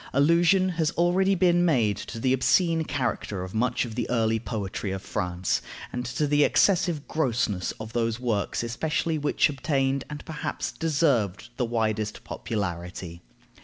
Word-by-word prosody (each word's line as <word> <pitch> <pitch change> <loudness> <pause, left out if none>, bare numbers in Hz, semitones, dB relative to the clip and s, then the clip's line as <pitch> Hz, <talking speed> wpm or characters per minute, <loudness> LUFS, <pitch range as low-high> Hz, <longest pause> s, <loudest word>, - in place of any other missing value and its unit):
Allusion 170 +6 +4
has 160 -2 +3
already 185 +3 +3
been 175 -1 +3
made 120 - +3
to 115 - -7
the 130 +2 +2
obscene 165 +5 +3
character 120 -9 -2
of 95 - -7
much 120 +3 +1
of 115 - -7
the 120 0 -3
early 115 -2 +2
poetry 105 -2 -4
of 95 0 -4
France, 90 0 -1 0.3
and 125 - -2
to 140 +4 -1
the 145 0 +3
excessive 175 -5 +2
grossness 115 - 0
of 110 0 -9
those 115 -1 0
works 115 -4 -1
especially 155 +6 -1
which 145 - +2
obtained, 135 -2 0
and 150 0 -7
perhaps 155 -2 -4
deserved, 125 - 0
the 125 - +1
widest 110 -2 -1
popularity. 90 -4 -5
125 Hz, 150 wpm, -26 LUFS, 110-155 Hz, 0.3 s, Allusion